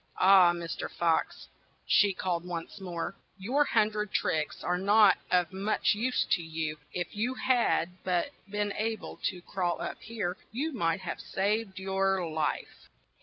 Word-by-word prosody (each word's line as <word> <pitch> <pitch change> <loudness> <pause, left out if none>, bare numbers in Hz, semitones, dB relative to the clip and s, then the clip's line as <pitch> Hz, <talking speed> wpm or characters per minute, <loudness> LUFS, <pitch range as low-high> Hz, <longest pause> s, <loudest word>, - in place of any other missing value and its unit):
"Ah! 185 -2 +7
Mr. 170 -1 -4
Fox," 165 -1 0 0.4
she 205 - +4
called 180 -2 -2
once 175 +2 -6
more, 175 0 -4 0.2
"your 250 +10 +2
hun 215 -6 +3
dred 210 -1 -3
tricks 155 -1 -1
are 180 0 0
not 205 +2 +5
of 180 -1 +2
much 200 +4 +1
use 245 +5 0
to 180 - +3
you; 160 -2 -4
if 175 +1 -4
you 240 +5 -1
had 235 -9 +1
but 180 +7 0 0.2
been 205 0 -1
a 220 +1 0
ble - - -10
to 180 -1 -2
crawl 180 -3 -2
up - - -5
here, 205 -5 -3
you 290 +8 -2
might 180 -4 0
have 180 - -5
saved 200 0 -1
your 190 -1 0
life." 155 -2 -3
190 Hz, 160 wpm, -29 LUFS, 175-210 Hz, 0.4 s, Ah